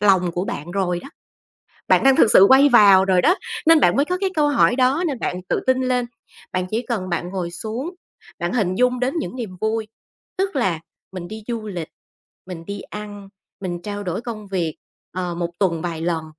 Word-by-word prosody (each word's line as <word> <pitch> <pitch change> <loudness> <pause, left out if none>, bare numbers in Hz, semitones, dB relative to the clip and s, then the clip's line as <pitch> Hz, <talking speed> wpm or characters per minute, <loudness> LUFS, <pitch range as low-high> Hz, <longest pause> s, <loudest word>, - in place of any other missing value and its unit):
lòng 185 -4 +3
của 180 +2 -2
bạn 160 0 -5
rồi 180 -2 -1
đó. - - -10 0.8
Bạn - - +4
đang 270 -1 +6
thực 220 - +5
sự 190 - +8
quay 270 +2 +7
vào 200 -6 +7
rồi 185 -2 +3
đó, 355 - +5 0.3
nên 325 -1 +7
bạn - - +4
mới 280 - +3
có 360 +4 -2
cái 390 -1 0
câu 300 -2 +2
hỏi 280 -3 +3
đó, 265 +7 +2
nên 280 -5 -2
bạn 180 -4 -3
tự - - 0
tin 260 0 +3
lên. 250 -1 0 0.5
Bạn 185 0 -1
chỉ 225 +2 -1
cần 220 -7 -3
bạn 175 0 -2
ngồi 180 -2 -4
xuống, 235 - -5 0.4
bạn 175 +1 -2
hình 190 -6 0
dung 250 +2 +1
đến 255 +2 0
những 280 - -4
niềm 215 -7 -6
vui, 220 0 -1 0.5
tức 385 -4 -1
là 185 -10 0 0.3
mình 175 -2 -7
đi 220 0 -8
du 230 -2 -3
lịch, 175 -6 -5 0.6
mình 175 -3 -8
đi 200 0 -5
ăn, 205 -1 -9 0.3
mình 175 -2 -4
trao 205 +1 -5
đổi 185 0 -3
công 225 -3 -7
việc, 170 -5 -2 0.4
ờ, 180 -1 -3
một 170 0 -3
tuần 170 -5 0
vài 170 -2 -4
lần 165 -1 -1
205 Hz, 210 wpm, -21 LUFS, 180-250 Hz, 0.8 s, sự